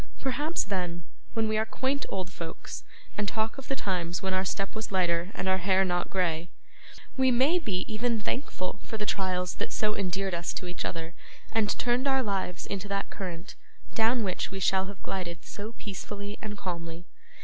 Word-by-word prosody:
Perhaps 290 +5 +1
then, 180 -4 -1 0.3
when 225 -1 +3
we 215 0 +3
are - - +5
quaint 265 +5 0
old 185 -2 -2
folks 165 -2 -6 0.4
and 205 - +2
talk 220 +5 0
of 270 - -8
the 270 - +1
times 180 -6 0
when 190 0 +1
our 185 0 +3
step 195 +1 -1
was 220 -1 -3
lighter 175 -2 +3
and 180 - -1
our 190 0 +4
hair 190 +1 +5
not 175 -1 +1
grey, 170 -2 +1 0.7
we 260 0 +6
may 265 +8 +5
be 195 - 0
even 230 +1 +1
thankful 210 -4 -2
for 220 - -4
the 210 - -1
trials 185 -3 +1
that - - -3
so 210 0 +2
endeared 195 0 0
us 170 0 0
to - - -2
each 180 0 -2
other, 165 0 -3 0.4
and 220 -2 +2
turned 245 +2 +3
our 265 -1 +4
lives 195 -4 -1
into 200 0 -3
that 200 0 -1
current, 180 -2 -5 0.4
down 230 +1 +4
which 185 -3 0
we 195 +1 -4
shall 190 0 +4
have 200 0 -8
glided 175 -3 -3
so 210 +3 -5
peacefully 205 0 -5
and 210 -1 -4
calmly. 170 -2 -4
195 Hz, 190 wpm, -30 LUFS, 180-220 Hz, 0.7 s, we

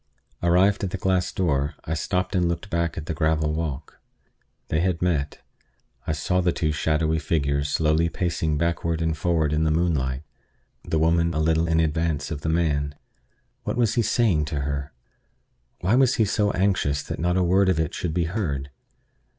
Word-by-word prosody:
Arrived 90 +4 +3
at 95 - 0
the 95 - -4
glass 95 -1 0
door, 75 -4 0
I 80 - -2
stopped 90 +4 -1
and 90 -2 +2
looked 85 +5 -4
back 85 0 -1
at 75 - -4
the 80 - -3
gravel 80 -1 +1
walk. 75 -3 -4 0.7
They 80 - +1
had 90 -1 0
met. 75 -5 -1 0.6
I - - +1
saw 85 +5 0
the 90 -1 +2
two 80 -2 -1
shadowy 80 +1 +1
figures 70 -2 0
slowly 80 +2 +2
pacing 80 -3 -1
backward 85 0 -1
and 80 -1 0
forward 80 -2 +1
in 75 +1 +1
the 80 - +2
moonlight, 75 -5 0 0.6
the 80 - -1
woman 85 +1 +2
a - - 0
little 80 +1 +2
in 80 0 +2
advance 80 -2 0
of 75 -3 -4
the 80 - -2
man. 75 -3 0 0.7
What - - -3
was 115 -3 +2
he 120 - +2
saying 105 -9 +2
to 70 -1 -3
her? 70 +1 -3 0.9
Why 95 +5 +1
was 130 0 +4
he 110 - +3
so 105 +1 +1
anxious 95 -8 +1
that - - -6
not 90 +2 +1
a 95 - +3
word 95 +2 +3
of 90 -4 +1
it 80 -2 -1
should 80 -3 -3
be 90 - +2
heard? 80 -7 -3
80 Hz, 185 wpm, -24 LUFS, 75-90 Hz, 0.9 s, was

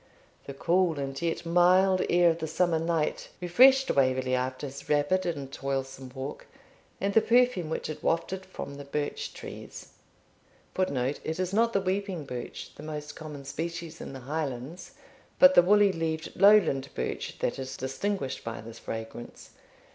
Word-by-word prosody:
The 140 - -6
cool 175 +1 +2
and 135 0 -4
yet 170 0 -2
mild 180 +2 +4
air 175 -1 +5
of 165 - -4
the 160 - -3
summer 165 +1 +1
night 165 -1 -1
refreshed 260 +10 +5
Waverley 130 -1 +2
after 130 +2 -1
his 140 0 -9
rapid 150 +6 +2
and 140 -5 -4
toilsome 135 -1 -4
walk; 135 +2 -6 0.5
and 200 +1 -1
the 225 - +6
perfume 240 -9 +3
which - - -3
it 155 - -6
wafted 185 +3 -1
from 165 -6 -8
the 145 - -7
birch 145 +1 -3
trees, - - -9 0.8
[Footnote: 140 -7 -1
It 160 +2 -3
is 185 0 -1
not 230 +2 +3
the 195 - +2
weeping 190 -4 -2
birch, 125 -2 -7
the - - -12
most 150 -1 -6
common 150 -3 -8
species 165 +3 -5
in - - -7
the 135 - -8
Highlands, 140 +2 -5 0.4
but 275 0 +8
the - - +8
woolly 205 +2 +5
leaved 160 -2 -3
Lowland 195 -10 +5
birch, - - -4
that - - -2
is 130 0 -5
distinguished 135 +2 -3
by 115 0 -5
this 115 0 -10
fragrance. 115 +1 -8
160 Hz, 160 wpm, -28 LUFS, 135-185 Hz, 0.8 s, but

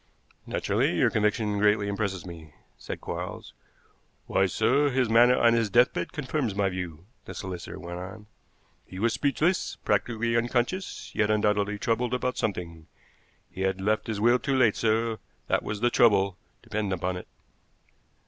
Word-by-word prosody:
"Naturally, - - 0
your - - +3
conviction 105 -1 0
greatly 105 0 +3
impresses 100 -3 -2
me," 80 -4 -11 0.2
said - - -7
Quarles. - - -6 0.7
"Why, 95 - +2
sir, 140 - +2
his 130 -3 +1
manner 120 +2 +6
on 115 0 +5
his 115 -2 +1
deathbed 120 +4 +2
confirms 135 - -2
my 100 -1 +1
view," 90 -3 -6 0.2
the - - -8
solicitor 90 -2 -6
went 85 +1 -6
on. 95 +3 -9 0.6
"He 95 - -11
was 115 +4 +1
speechless, 155 +6 0
practically 115 0 0
unconscious, 120 +10 -1
yet 105 -1 +1
undoubtedly 105 -1 +1
troubled 120 +3 0
about 125 0 -2
something. 85 -5 -4 0.6
He 95 - -7
had 95 0 0
left 105 +3 0
his 110 -2 -3
will 120 +3 +4
too 135 - -1
late, 115 -5 +4
sir; 115 0 0 0.3
that - - +1
was 105 0 -5
the 120 0 +3
trouble, 100 -6 +4 0.3
depend 110 -4 -3
upon 90 0 -1
it." 90 - -8
105 Hz, 155 wpm, -27 LUFS, 95-120 Hz, 0.7 s, manner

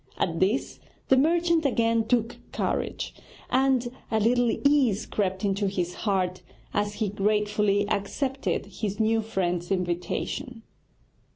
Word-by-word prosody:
At 165 -2 -1
this 205 +8 0 0.3
the 265 - +7
merchant 335 +4 +3
again 230 -4 +2
took 235 -1 +1
courage, - - -2 0.4
and 260 -1 +3 0.2
a 220 - +1
little 240 +2 +3 0.2
ease 260 -8 +3
crept 190 -1 -1
into 200 0 +1
his 180 -2 -2
heart 185 -4 -1 0.3
as 205 0 0
he 215 -3 -1
gratefully 205 0 +1
accepted 260 +8 -1
his 205 +1 -4
new 225 0 +3
friend's 180 -5 -2
invitation. 190 - -2
210 Hz, 120 wpm, -26 LUFS, 195-245 Hz, 0.4 s, the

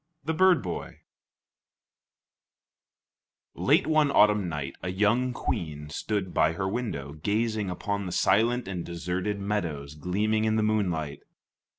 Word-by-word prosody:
THE 160 - 0
BIRD 185 +1 +4
BOY 90 -3 -6 2.5
Late - - +3
one 155 -2 +3
autumn 105 -7 +4
night 70 -4 -4
a 90 - -3
young 105 +7 +2
queen 75 -9 -4
stood 100 +2 -2
by 80 - +3
her 95 +2 -2
window, 95 - -3
gazing 105 +5 -1
upon 100 +2 -3
the - - -4
silent 120 +6 +2
and 90 -3 -4
deserted 90 +4 -3
meadows 85 -9 -3
gleaming 105 +8 0
in 110 0 +2
the 110 - +2
moonlight. 90 -9 -1
100 Hz, 125 wpm, -27 LUFS, 85-110 Hz, 2.5 s, BIRD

